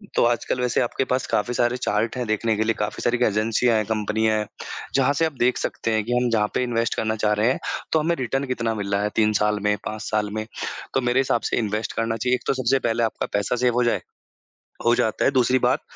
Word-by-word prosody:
तो -, -, +4 dB
आजकल 120 Hz, +1 st, 0 dB
वैसे 125 Hz, -1 st, +1 dB
आपके 120 Hz, +2 st, 0 dB
पास 130 Hz, 0 st, +1 dB
काफ़ी 120 Hz, +4 st, 0 dB
सारे 120 Hz, +1 st, +1 dB
चार्ट 110 Hz, 0 st, -1 dB
हैं, 125 Hz, -, -2 dB
देखने 110 Hz, +1 st, +1 dB
के 110 Hz, -, +2 dB
लिए। 115 Hz, 0 st, +1 dB
काफ़ी 105 Hz, -, -2 dB
सारी 120 Hz, +1 st, +2 dB
एजेन्सियाँ 110 Hz, +3 st, +2 dB
हैं, 110 Hz, -, 0 dB
कम्पनियाँ 110 Hz, 0 st, 0 dB
हैं 105 Hz, -1 st, -2 dB, 0.5 s
जहाँ 135 Hz, +1 st, +3 dB
से 165 Hz, -, +4 dB
आप 160 Hz, -, -2 dB
देख 125 Hz, +1 st, +3 dB
सकते 115 Hz, -, -2 dB
हैं 110 Hz, -1 st, +1 dB
कि 120 Hz, -, -1 dB
हम 125 Hz, 0 st, +2 dB
जहाँ 105 Hz, -2 st, +2 dB
पे -, -, +2 dB
इन्वेस्ट 115 Hz, -2 st, 0 dB
करना 110 Hz, 0 st, -1 dB
चाह 105 Hz, -, +3 dB
रहे 105 Hz, +4 st, +2 dB
हैं, -, -, -2 dB, 0.3 s
तो 160 Hz, -, +3 dB
हमें 170 Hz, +2 st, +1 dB
रिटर्न 135 Hz, +2 st, -1 dB
कितना 115 Hz, -2 st, -1 dB
मिल 100 Hz, -1 st, -4 dB
रहा 100 Hz, -, +2 dB
है 105 Hz, -, 0 dB
3 110 Hz, -1 st, +3 dB
साल 105 Hz, 0 st, +2 dB
में, 105 Hz, 0 st, +2 dB
5 110 Hz, 0 st, -4 dB
साल 105 Hz, -1 st, 0 dB
में। 110 Hz, 0 st, -2 dB, 0.5 s
तो 135 Hz, -, +2 dB
मेरे 125 Hz, +2 st, +2 dB
हिसाब 125 Hz, -3 st, +1 dB
से -, -, +1 dB
इन्वेस्ट 110 Hz, -1 st, -2 dB
करना 115 Hz, 0 st, -1 dB
चाहिए। 125 Hz, +3 st, +1 dB
एक -, -, -7 dB
तो -, -, +3 dB
सबसे 130 Hz, +2 st, +2 dB
पहले 115 Hz, +1 st, +1 dB
आपका 110 Hz, -, -1 dB
पैसा 100 Hz, +4 st, +1 dB
सेव 120 Hz, -, +3 dB
हो 125 Hz, -, +3 dB
जाए 120 Hz, -, +1 dB, 0.9 s
हो 120 Hz, -, +6 dB
जाता 110 Hz, -, 0 dB
है। -, -, +5 dB
दूसरी 130 Hz, -1 st, +3 dB
बात -, -, +2 dB
115 Hz, 250 wpm, -23 LUFS, 110-125 Hz, 0.9 s, हो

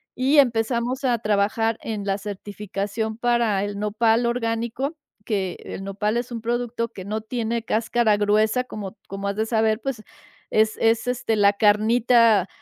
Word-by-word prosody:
y 270 Hz, +4 st, +2 dB
empezamos 245 Hz, +1 st, +2 dB
a 240 Hz, -2 st, +2 dB
trabajar 215 Hz, +1 st, +1 dB
en 210 Hz, -3 st, -4 dB
la 195 Hz, 0 st, -1 dB
certificación 205 Hz, +2 st, -4 dB
para 235 Hz, -4 st, +1 dB
el 205 Hz, 0 st, -4 dB
Nopal 225 Hz, +3 st, +2 dB
orgánico, 235 Hz, +5 st, -2 dB, 0.3 s
que 195 Hz, -5 st, -2 dB
el 195 Hz, -, -6 dB
Nopal 210 Hz, +3 st, -1 dB
es 245 Hz, +1 st, -3 dB
un 230 Hz, -, -4 dB
producto 235 Hz, 0 st, -2 dB
que 190 Hz, -5 st, -9 dB
no 215 Hz, +1 st, -3 dB
tiene 230 Hz, 0 st, -3 dB
cáscara 225 Hz, -1 st, +1 dB
gruesa 215 Hz, +4 st, +2 dB
como 205 Hz, -6 st, -7 dB
como 195 Hz, +1 st, -5 dB
has 200 Hz, -, -2 dB
de 220 Hz, -, +1 dB
saber, 220 Hz, -1 st, +1 dB
pues 250 Hz, -6 st, -4 dB, 0.5 s
es 220 Hz, 0 st, +2 dB
es, 225 Hz, +1 st, +2 dB
este, 245 Hz, -2 st, 0 dB
la 200 Hz, -1 st, +4 dB
carnita, 220 Hz, 0 st, +4 dB
220 Hz, 155 wpm, -23 LUFS, 205-235 Hz, 0.5 s, la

